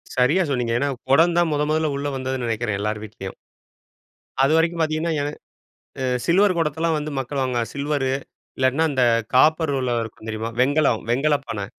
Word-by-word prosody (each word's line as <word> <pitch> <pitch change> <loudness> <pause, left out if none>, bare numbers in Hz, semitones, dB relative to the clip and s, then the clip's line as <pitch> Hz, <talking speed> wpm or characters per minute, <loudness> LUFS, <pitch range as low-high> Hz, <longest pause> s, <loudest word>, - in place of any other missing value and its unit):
சரியா 140 +9 +3
சொன்னீங்க. 125 -4 0
ஏன்னா 140 - 0 0.2
குடம் 165 +5 +5
தான் 170 -2 +3
முதன் 150 0 0
முதல 155 -1 +1
உள்ள 140 +1 -3
வந்ததுன்னு 130 -1 -3
நெனைக்கிறேன். 110 -2 -1
எல்லார் 105 0 -2
வீட்லயும். 95 -2 -8 1.1
அதுவரைக்கும் 165 +4 +2
பார்த்தீங்கன்னா, 160 +1 0
எ - - -1 0.8
அ - - -1 0.2
சில்வர் 185 +1 +3
குடத்தல்லாம் 160 0 0
வந்து 150 0 -4
மக்கள் 135 +2 -3
வாங்குவாங்க. 120 -3 -1
சில்வரு 140 -1 -1 0.5
இல்லாட்டின்னா 130 +5 +2
அந்த 130 -2 +2 0.3
காப்பர்ல 140 -4 +3
இருக்கும் 110 0 -10
தெரியுமா? 110 +1 -3
வெண்கலம் 140 -3 +2
வெண்கலப்பானை. 135 -6 0
140 Hz, 150 wpm, -22 LUFS, 125-155 Hz, 1.1 s, குடம்